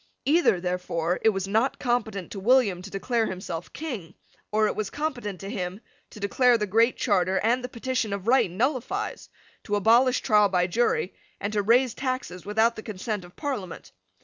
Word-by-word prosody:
Either, 300 - +3
therefore, 180 -1 -2
it 225 - +5
was 195 -2 -2
not 220 +6 +1
competent 225 -7 -2
to 200 - -5
William 210 -4 +3
to 190 - -9
declare 220 +4 -1
himself 180 -2 -6
King, 220 - -6 0.4
or 215 +1 +3
it - - 0
was 215 -2 -2
competent 245 - -4
to 195 - -7
him 185 -1 -4 0.3
to 215 - -12
declare 240 +4 +3
the 210 - -1
Great 230 +5 +3
Charter 190 -3 +1
and 240 +4 +1
the 250 - -4
Petition 245 -2 -2
of 200 0 -4
Right 255 -5 +4
nullifies, 260 - -2 0.3
to 205 - -1
abolish 235 +5 +4
trial 210 -2 +4
by 180 -1 +2
jury, 240 - 0 0.3
and 205 +1 -3
to 210 - +2
raise 240 +4 +3
taxes 255 -9 -4
without 220 +3 +2
the - - -7
consent 210 -1 -4
of 175 0 -15
Parliament. 250 - -5
215 Hz, 180 wpm, -26 LUFS, 190-250 Hz, 0.4 s, it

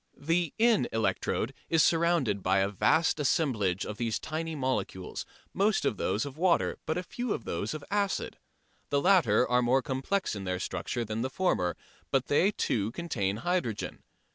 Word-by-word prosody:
The 165 +1 0
in 225 - +4
electrode 115 +2 -1 0.2
is 165 -1 +4
surrounded 165 - +2
by 95 +1 +2
a 95 +1 +2
vast 160 - +2
assemblage 115 - +1
of 105 - -6
these 115 -2 -1
tiny 160 +1 -4
molecules, 125 -9 -3 0.3
most 205 +3 +2
of 105 - 0
them - - -1
those 100 +6 0
of 140 +2 -8
water, 180 -1 +2
but 160 - 0
a 180 - -2
few 240 +4 -3
those 105 - -4
of 155 - -6
the 145 - -9
acid. 200 -1 -1 0.5
The 140 - +2
latter 140 - +4
are 125 +1 +3
more 125 +2 +2
complex 135 - -1
in 100 - -5
their 90 -1 -2
structure 120 +5 -3
than 110 +1 -3
the 130 - -1
former, 155 - 0 0.3
but 135 -1 0
they 165 +7 +4
too 110 - -1
contain 105 - -2
hydrogen. 175 - -1
135 Hz, 175 wpm, -29 LUFS, 105-170 Hz, 0.5 s, in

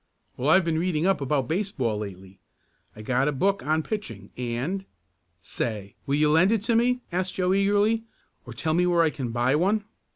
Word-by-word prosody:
"Well, 135 +4 -1
I've 190 +2 +5
been 160 -1 0
reading 170 -2 0
up 195 -5 +2
about 135 -2 0
baseball 145 - -1
lately. 95 -2 -9 0.6
I 110 - -10
got 130 +4 +1
a - - +2
book 195 +8 0
on 155 +1 +1
pitching, 115 - -6
and 125 +11 -3 0.3
" 85 0 -47 0.2
"Say, 105 -4 -3
will 140 - +1
you 150 0 +3
lend 170 +6 +4
it 220 -3 +1
to 230 +1 +1
me?" 250 +2 +2
asked 185 +1 -2
Joe 185 0 +1
eagerly. 205 +3 +2 0.4
"Or 120 - -10
tell 155 +6 -1
me 180 +2 +2
where 170 -1 +3
I 160 - +2
can 130 -6 -4
buy 120 +4 +1
one?" 200 +6 +1
155 Hz, 200 wpm, -25 LUFS, 120-195 Hz, 0.6 s, I've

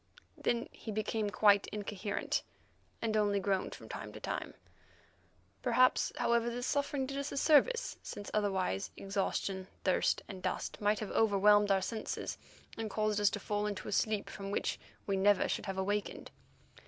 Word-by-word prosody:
Then 235 0 0
he 220 - -7
became 215 0 -1
quite 205 -1 +4
incoherent, 205 -1 -2 0.6
and 220 -1 0
only 205 -1 +3
groaned 195 -1 -1
from - - -12
time - - -6
to - - -8
time. - - -4 1.1
Perhaps, 255 0 +4
however, 235 0 +2
this 245 +1 -3
suffering 285 -1 0
did 275 +1 -4
us 280 - -3
a - - -4
service, 325 - +4
since 205 - -7
otherwise 190 - 0
exhaustion, 195 -1 -2 0.2
thirst, 185 - +2
and 190 -2 -8
dust - - -3
might 210 +1 +3
have 215 - -4
overwhelmed 205 -1 +5
our 195 -1 +3
senses, 220 +2 -4 0.4
and 225 -1 -3
caused 215 0 0
us 205 - +5
to 205 - -4
fall 210 +1 -1
into 205 -2 -4
a - - -4
sleep 210 0 +1
from 195 -1 -6
which 200 - -1 0.3
we 195 -1 0
never 200 +1 +4
should - - -2
have 195 -1 -3
awakened. 205 +2 -2
205 Hz, 165 wpm, -33 LUFS, 200-225 Hz, 1.1 s, overwhelmed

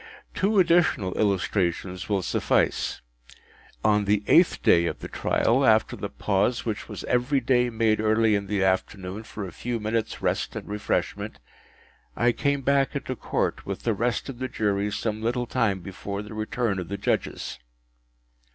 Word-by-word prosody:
Two 205 +3 +1
additional 170 - +3
illustrations 95 -2 0
will 100 -3 +1
suffice. - - 0 0.8
On 105 -1 +3
the 105 +1 +2
eighth 170 +1 +4
day 85 0 +5
of - - -3
the - - -7
trial, 125 +4 +1
after 110 -3 +4
the 100 - -5
pause 105 +4 0
which 110 -3 -4
was - - -6
every 125 +3 +1
day 125 -1 +2
made 110 -2 +1
early 110 0 +3
in 100 -1 0
the 100 -2 0
afternoon 95 +1 -1
for 105 -2 -7
a 90 - -7
few 120 -1 -3
minutes’ 110 +1 -2
rest - - -1
and - - -6
refreshment, 105 0 -2 0.8
I 120 +1 +3
came 140 +3 0
back 140 +1 +2
into 130 -2 -3
Court - - -2
with - - -4
the 115 - +1
rest 115 +3 -1
of 130 -3 -7
the 130 - -2
Jury 105 -4 0
some 110 +1 -2
little 120 +2 0
time 115 -6 0
before 100 +2 -6
the 105 - -10
return 110 -1 -1
of 90 - -5
the 100 - -4
Judges. 95 - -2
110 Hz, 165 wpm, -26 LUFS, 100-120 Hz, 0.8 s, day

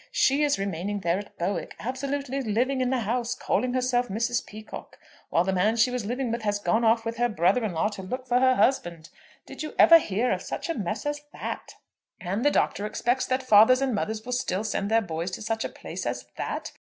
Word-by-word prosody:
She 290 - +3
is 290 -1 +2
remaining 195 +1 -3
there 175 +1 +1
at 205 - -11
Bowick, 175 0 -3
absolutely 275 +2 -3
living 255 +4 0
in 250 - +1
the 260 -2 0
house, 240 +2 -1
calling 250 0 -1
herself 250 -1 +1
Mrs. 235 +4 -1
Peacocke, 215 +1 -10 0.3
while 170 - +3
the 190 +1 -1
man 200 +5 +2
she 235 +2 +3
was 245 -5 -3
living 250 +1 -2
with 235 0 -2
has 205 -1 0
gone 220 +3 +1
off 225 0 +3
with 230 0 -3
her 240 0 +2
brother 200 +3 +2
in 210 -5 -2
law 165 +6 +1
to 205 - -8
look 255 +7 -5
for 245 0 +2
her 255 0 +4
husband! 175 -13 0 0.3
Did - - -9
you 305 - -6
ever 335 0 +9
hear 225 -1 -1
of 185 -1 -1
such - - -5
a - - +1
mess 210 - -4
as 290 0 -2
that? - - -6 0.4
"And 195 +5 -2
the 290 - +5
Doctor 210 -7 0
expects 245 +4 0
that 260 +1 0
fathers 225 +2 +6
and 270 -2 0
mothers 220 +1 -3
will 250 - -5
still 215 -5 -1
send 205 -2 -2
their 225 +1 +4
boys 170 -2 -4
to - - -12
such 225 +1 -2
a - - -3
place - - -7
as - - -3
that? - - -4
230 Hz, 230 wpm, -26 LUFS, 205-255 Hz, 0.4 s, ever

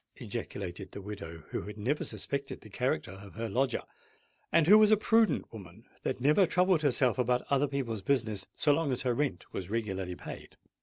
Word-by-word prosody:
ejaculated 95 -1 -6
the - - -6
widow, 95 -6 -8
who - - -2
had 105 0 -8
never 130 +8 -1
suspected 140 0 -4
the - - -14
character - - -1
of 95 0 -12
her 115 +1 -3
lodger, 125 +4 0 0.7
and 165 -1 +5
who 210 +6 +8
was 215 -1 +6
a 215 - +6
prudent 225 - +2
woman 100 0 -11 0.2
that 130 - -2
never 150 +8 +4
troubled 180 -2 +3
herself 130 -3 +2
about 125 0 +1
other 140 +1 +3
people's 125 -6 -3
business 110 -4 0
so 150 - +3
long 145 -2 0
as 130 +1 -1
her 125 -2 +1
rent 135 -7 -1
was 95 -1 -5
regularly 95 -5 -2
paid. - - -10
125 Hz, 190 wpm, -31 LUFS, 100-145 Hz, 0.7 s, who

